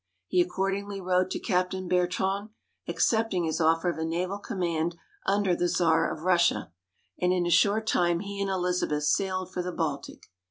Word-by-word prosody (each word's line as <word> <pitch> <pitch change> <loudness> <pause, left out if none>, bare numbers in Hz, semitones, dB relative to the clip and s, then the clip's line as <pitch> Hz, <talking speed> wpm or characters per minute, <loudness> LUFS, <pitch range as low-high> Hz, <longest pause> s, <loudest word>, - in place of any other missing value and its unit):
He 180 - +2
accordingly 195 +3 -2
wrote 185 0 +1
to - - -2
Captain 185 -1 -1
Bertrand, 190 +3 0 0.4
accepting 220 -6 +1
his 160 +1 -1
offer 165 +2 +3
of 170 -2 -1
a - - -1
naval 180 +5 -2
command 170 -5 -2 0.3
under 195 -2 +2
the 175 - 0
Czar 165 -2 +2
of 155 - -7
Russia; 175 - +2 0.5
and 180 0 +2
in 180 -1 +1
a 175 - 0
short 205 +5 +3
time 175 -4 +2
he 200 0 -5
and 200 - -1
Elizabeth 180 -5 0
sailed 185 +3 0
for 180 - -1
the 180 +1 -4
Baltic. 150 -5 -4
180 Hz, 170 wpm, -27 LUFS, 170-195 Hz, 0.5 s, offer